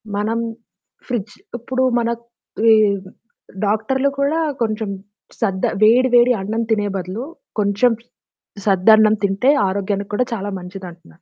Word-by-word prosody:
మనం 220 +3 -1 0.7
ఫ్రిడ్జ్ 225 -4 -4 0.2
ఇప్పుడు 260 +2 -2 0.2
మనక్ 235 0 -2 0.4
వీరు 200 -4 +3 0.5
డాక్టర్లు 240 +7 +1
కూడా 290 +4 +1 0.2
కొంచెం 220 -2 -1 0.5
సద్ద 195 -4 0 0.2
వేడి 245 +4 +5
వేడి 245 +1 +6
అన్నం 220 +4 -2
తినే 210 -2 +1
బదులు, 190 +6 -4 0.4
కొంచెం 205 +4 +2 0.7
సద్దన్నం 215 +2 +5
తింటే 200 +7 +2 0.2
ఆరోగ్యానికి 200 +1 -2
కూడా 250 +4 +1
చాలా 205 -2 -3
మంచిదంటున్నారు. 180 -2 -11
215 Hz, 110 wpm, -19 LUFS, 195-235 Hz, 0.7 s, వేడి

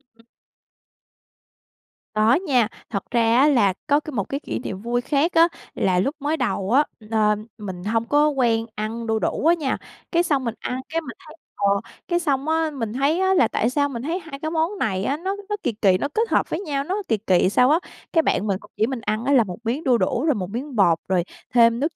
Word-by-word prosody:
Ừ. 230 0 -24 1.9
Có 215 +2 +4
nha. 270 - +2 0.2
Thật 200 -3 -3
ra 230 -1 +3
á, 275 +3 +6
là 225 -10 +3
có 290 0 +4
cái 305 - -8
một 220 -8 -1
cái 275 - -2
kỷ - - -4
niệm 195 -5 -6
vui 240 +2 -1
khác 295 +6 +1
á. 330 +1 +6 0.3
Là 185 -2 +2
lúc 275 - 0
mới 300 +3 -1
đầu 220 -7 -1
á, 275 +4 +5 0.3
ờ, 210 -1 +3 0.2
mình 190 -5 -7 0.3
có 290 - +4
hông 300 -3 +1
quen 225 -2 +2
ăn 225 +2 -4
đu 220 0 +1
đủ - - -1
á 335 - +7
nha, 300 -6 -1 0.3
cái 340 0 +3
xong 285 -6 0
mình 230 -1 -2
ăn, 250 - -3
cái, 330 +1 -1
mình 265 -8 -9
thấy 310 - -12 0.2
ờ, 200 -1 +1 0.4
cái 345 -1 +1
xong 285 -4 -1
á, 320 0 +1
mình 230 -6 -4
thấy 280 +7 +1
á, 380 0 +3
là 365 - +4
tại 230 - 0
sao 285 +2 +1
mình 240 -4 -5
thấy 330 +6 -2
hai 310 -5 -9
cái 315 +2 -3
món 330 +5 0
này 190 -3 0
á, 280 +7 0
nó 380 +4 -3
nó 420 - 0
kỳ 245 - +1
kỳ, 200 -4 +3
nó 255 - -1
kết 450 +1 0
hợp - - +1
với - - -2
nhau, 285 -7 -2
nó 380 +7 -2
kỳ 220 - +2
kỳ 185 -3 +2
sao 250 +5 +4
á. 315 +3 +4 0.3
Cái 325 - +5
bạn 215 - 0
mình 195 -2 0
cũng - - -17
chỉ 220 - +2
mình 260 -2 -4
ăn 215 +2 -2
á, 280 - +2
là 250 -4 +6
một 180 -4 -7
miếng 245 +7 -2
đu 250 -3 +3
đủ, 230 +5 0
rồi 305 -4 +3
một 185 -4 -4
miếng 255 +6 -5
bột, 175 -6 +4
rồi 185 -2 +1 0.3
thêm 230 -1 +5
nước 305 +4 -1
255 Hz, 245 wpm, -23 LUFS, 220-305 Hz, 1.9 s, á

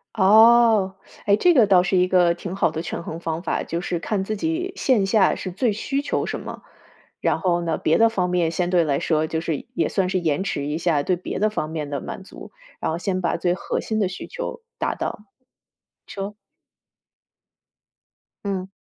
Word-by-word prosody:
哦， 220 -1 +5 0.3
哎， 200 0 +5
这 355 +10 +4
个 240 -7 +6
倒 190 -3 +5
是 185 +1 0
一 180 0 +3
个 180 -2 +4
挺 180 +2 -6
好 180 - +2
的 160 +1 -4
权 170 - -5
衡 165 0 -6
方 165 0 -3
法， 180 - -1
就 170 - -3
是 175 0 -2
看 190 +3 -2
自 215 +1 -3
己 330 - -2
线 230 -8 +2
下 195 -1 +3
是 185 - -5
最 230 +4 +1
需 275 +7 -2
求 290 - -1
什 - - -4
么。 - - -8 0.6
然 - - +1
后 175 -3 +1
呢， 165 -2 -1
别 155 - +2
的 230 - +6
方 185 -5 -1
面 175 -2 +1
相 175 +1 -1
对 175 -2 +3
来 140 -3 0
说 155 -1 +1
就 160 0 -2
是 160 -3 -3
也 165 - +1
算 190 -2 0
是 185 - 0
延 160 0 0
迟 145 -7 -2
一 150 +2 -2
下， 165 -4 +1
对 185 - +1
别 175 - -5
的 215 +2 +2
方 155 -7 -3
面 155 -3 -4
的 140 -2 -3
满 - - -7
足， - - -12 0.3
然 - - -1
后 165 - -3
先 185 0 -2
把 175 - 0
最 175 -1 0
核 - - -3
心 220 - -2
的 200 -3 +1
需 180 - -7
求 - - -6 0.2
达 - - -1
到， - - -4 0.9
说。 200 +1 -6 2.1
嗯。 190 -2 -3
185 Hz, 225 characters per minute, -23 LUFS, 170-210 Hz, 2.1 s, 个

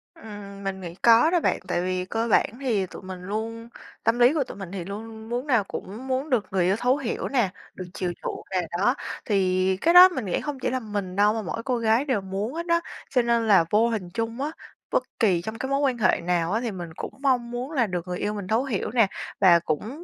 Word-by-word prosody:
Ừm, 200 -2 -10
mình 190 -1 -4
nghĩ 170 -1 -7
có 235 +9 +5
đó 350 - +3
bạn. - - +1
Tại 175 -1 0
vì 185 0 -1
cơ 225 +4 -2
bản - - +4
thì 220 -8 +1
tụi 185 - -11
mình 185 -1 -8
luôn 225 +4 -5 0.3
tâm 230 +2 +2
lý 245 +4 +6
của 295 -4 +1
tụi - - -10
mình 195 -3 -7
thì 185 -3 -5
luôn 200 +3 -6
luôn 220 0 -11
muốn 245 +4 -3
nào 235 -7 +3
cũng 210 +5 -7
muốn 265 +3 -1
được 240 -6 +1
người 185 -2 +2
yêu 190 - +3
thấu 250 +4 +2
hiểu 270 -5 -3
nè, 240 -8 +1 0.2
được 185 - -7
chiều 180 -3 -2
chuộng - - -5
nè, 185 -1 +1 0.2
đó. 245 +7 +3 0.3
Thì 185 -2 +1
cái 335 +2 +4
đó 365 +1 +11
mình 260 - -4
nghĩ 185 - -1
hông 290 -3 -5
chỉ - - -1
là 260 +1 -1
mình 205 -5 -4
đâu 205 +1 +4
mà 225 - -2
mỗi 225 +2 -5
cô 250 -1 0
gái 230 +4 +2
đều 245 -8 0
muốn 195 +5 -4
hết 335 +2 -4
đó. 335 0 +2 0.3
Cho 250 -2 +3
nên 235 -1 +1
là 195 -6 +6
vô 220 +3 +4
hình 200 -6 -3
chung 230 +2 -3
á, 295 +2 -1 0.4
bất - - +2 0.2
kỳ 190 -8 +3
trong 220 +5 -6
cái 265 - -3
mối 275 - +2
quan 265 -4 +1
hệ 195 -5 +2
nào 175 0 0
á 225 +2 0
thì 235 -3 -2
mình 175 -3 -6
cũng - - -6
mong 250 -4 +1
muốn 250 +5 -4
là 245 -8 +1
được 180 -1 -4
người 180 0 -3
yêu 210 - -1
mình 200 -3 -5
thấu 225 +5 +2
hiểu 230 -7 -2
nè 230 -3 +4 0.3
và 175 -3 +7
cũng 215 - -4
220 Hz, 260 wpm, -25 LUFS, 190-250 Hz, 0.4 s, đó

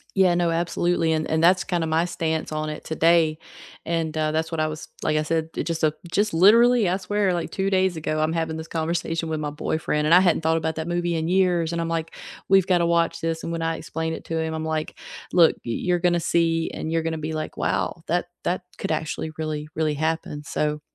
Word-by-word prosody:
Yeah, 185 -3 +4
no, 175 -1 +1
absolutely, 170 0 +1
and 155 0 0
and 160 0 +1
that's 180 +2 +5
kind 175 -3 -1
of - - -3
my 160 +2 +2
stance 160 -3 -2
on 155 0 -2
it 150 - -6
today, 160 -1 +3 0.5
and, 165 -2 -1
uh, 155 0 +1
that's 160 +1 -1
what 165 - -3
I 155 - +2
was 155 0 -7
like 155 - +1
I 155 - +1
said, 160 +1 -1
it - - -1
just 165 -1 0 0.3
just 205 +1 +1
literally, 225 +4 +6
I 185 - +1
swear, 200 0 0
like 170 -1 -2
2 195 0 -1
days 190 -2 +2
ago, 155 0 -2
I'm 155 +1 +1
having 160 -1 -2
this 160 0 -7
conversation 165 0 -2
with 155 -1 -2
my 150 -1 -3
boyfriend 150 0 -1
and 165 - +4
I 180 - +9
hadn't 175 -3 +3
thought 160 0 +2
about 160 0 -2
that 160 +1 -4
movie 175 0 0
in 160 0 -1
years 180 -3 +2
and 170 - -2
I'm 165 - -1
like, 165 -1 -3 0.4
"We've 195 -1 +5
got 180 -2 +3
to 170 - +2
watch 170 0 +1
this," 165 0 -2
and 170 - -3
when 165 - -3
I 165 0 -1
explained 160 0 -4
it - - -14
to 165 - -3
him, 160 0 -1
I'm 160 0 -3
like, 155 -1 -3 0.3
"Look, 170 -3 +6
y 120 - -3
you're 175 +8 0
gonna 175 -1 +2
see 165 -1 +1
and 160 - -4
you're 165 -1 0
gonna 165 0 -2
be 155 +1 -4
like, 155 0 -4
'Wow, 170 - -1
that 175 +2 0 0.2
that 180 +1 -1
could - - -3
actually 155 0 -2
really, 155 -1 -4
really 155 -1 +1
happen.'" 155 -1 -2
So 150 +1 -2
165 Hz, 240 wpm, -24 LUFS, 160-175 Hz, 0.5 s, I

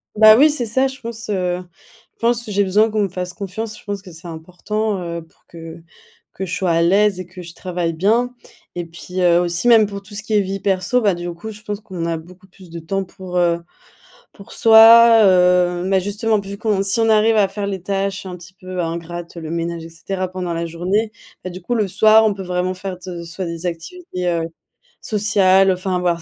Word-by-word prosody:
bah, 215 0 +8
oui 300 +3 +6
c'est 250 -6 -1
ça, 260 +5 +1
je 265 +1 -9
pense, 230 -1 -7
heu, 180 -2 -1 0.5
je - - -49
pense, 235 -1 0
j'ai 205 0 +1
besoin 210 +4 +2
qu'on 215 -1 0
me 200 - 0
fasse 180 0 -5
confiance, 210 +2 -6
je - - -18
pense 205 -1 -4
que 185 -2 -13
c'est 165 +1 -12
important, 185 +6 -3
heu, 170 -1 -5
pour 160 - -25
que 165 0 -11 0.5
que 190 - -5
je 175 - -7
sois 180 -3 0
à 165 0 +2
l'aise, 195 +2 +3
et 185 - -7
que 180 +1 -11
je 170 0 -10
travaille 175 -2 -3
bien. 230 +9 +1 0.4
Et 175 -1 -4
puis, 180 +2 -7
heu, 175 -1 +4
aussi 175 +6 0
même 225 -3 +6
pour 200 -1 -8
tout 205 +1 -12
ce 205 - -4
qui 220 - -6
est 210 - +5
vie 195 0 -3
perso, 195 +5 0
bah, 205 -5 +2
du 175 0 -5
coup, 175 +6 -8
je 210 0 -12
pense 205 -1 -5
qu'on 185 -6 -6
a 165 -1 -1
beaucoup 180 +4 -14
plus 185 -2 -17
de 170 0 -7
temps 195 +4 -3
pour, 185 -1 -9
heu, 170 -1 +2 0.7
pour 200 - -15
soi. 225 +1 +8
Heu, 180 -1 +3
mais 190 0 +2
justement 210 +3 -1
p 195 - -11
vu 200 - -6
qu'on 210 -2 0
si 195 +4 0
on 225 0 +3
arrive 220 +1 +4
à 200 -2 +3
faire 200 0 -5
les 190 -3 -4
tâches, 195 0 -2
un 185 -1 -7
petit 175 +2 -15
peu 185 -1 -6
ingrates, 170 +1 -5
le 160 -2 -7
ménage, 170 0 -3
et 165 - -10
cetera 185 +3 -4
pendant 180 -2 -4
la 170 - -2
journée, 190 +7 -1 0.3
ben, 185 - -6
du 185 - -9
coup, 240 +8 -3
le 215 -3 +1
soir, 215 +3 +5
on 215 - +3
peut 195 -1 -7
vraiment 180 0 -2
faire 185 0 -6
de 170 -2 -6
soit 170 +3 -6
des 170 +1 -5
activités, 180 - -5
heu, 170 -1 0 0.6
sociales 195 -3 +3
enfin 185 0 -1
voir 170 -2 0
190 Hz, 230 wpm, -19 LUFS, 175-210 Hz, 0.7 s, bah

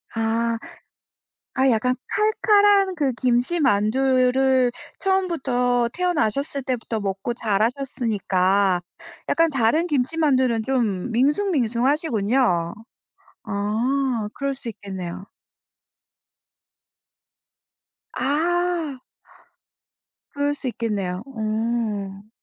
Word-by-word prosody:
아. 230 +1 0 1.0
아 265 0 +4
약간 250 +3 +1 0.5
칼칼한 405 -3 +5
그 285 -6 0
김치만두를 255 0 +2 0.3
처음부터 265 -11 +1
태어나셨을 285 -5 -1
때부터 240 -4 -3
먹고 195 +4 -3
자라셨으니까 205 -5 0 0.5
약간 330 0 +3
다른 275 +6 +2
김치만두는 260 -4 +1
좀 225 -6 -1
밍숭밍숭하시군요. 250 - +1 0.7
아 225 +3 -1
그럴 275 0 -2
수 255 -3 -5
있겠네요. 190 -3 -7 2.9
아. 325 +1 0 1.3
그럴 285 0 0
수 285 -2 -6
있겠네요. 205 -6 -3
어. 215 -4 -3
250 Hz, 180 characters per minute, -23 LUFS, 215-280 Hz, 2.9 s, 칼칼한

